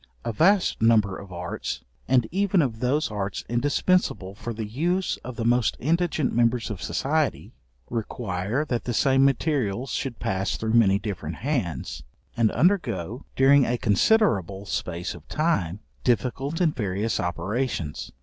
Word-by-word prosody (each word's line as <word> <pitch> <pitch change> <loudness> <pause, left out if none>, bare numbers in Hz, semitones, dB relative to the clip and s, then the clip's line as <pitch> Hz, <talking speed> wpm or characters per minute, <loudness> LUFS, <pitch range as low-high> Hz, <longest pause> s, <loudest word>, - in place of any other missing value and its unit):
A 115 - -1
vast 185 - +3
number 110 -4 +4
of 100 -1 -10
arts, 85 -1 -5 0.2
and 125 -2 +4
even 195 -1 +2
of 115 -5 -3
those 135 +3 0
arts 100 -1 -3
indispensable 125 - +1
for 115 +3 -6
the 110 -1 -4
use 170 - -1
of 125 0 -8
the 115 - -3
most 120 0 +2
indigent 160 -1 +1
members 120 -1 +1
of 100 - -6
society, 150 +1 -1 0.3
require 110 +2 -2
that 120 -5 -2
the 120 - -2
same 135 +1 +4
materials 135 -4 +1
should 130 -5 -3
pass 95 +1 -1
through 110 0 -2
many 100 -5 +5
different 95 -6 -5
hands, 115 - -3 0.3
and 115 -2 +3
undergo, 135 - 0
during 135 +1 +6
a 120 +1 0
considerable 100 - +2
space 90 -2 -3
of 85 -2 -13
time, 105 - 0 0.2
difficult 135 +5 0
and 165 -4 +2
various 105 -1 -1
operations. 95 - -2
120 Hz, 145 wpm, -25 LUFS, 100-140 Hz, 0.3 s, during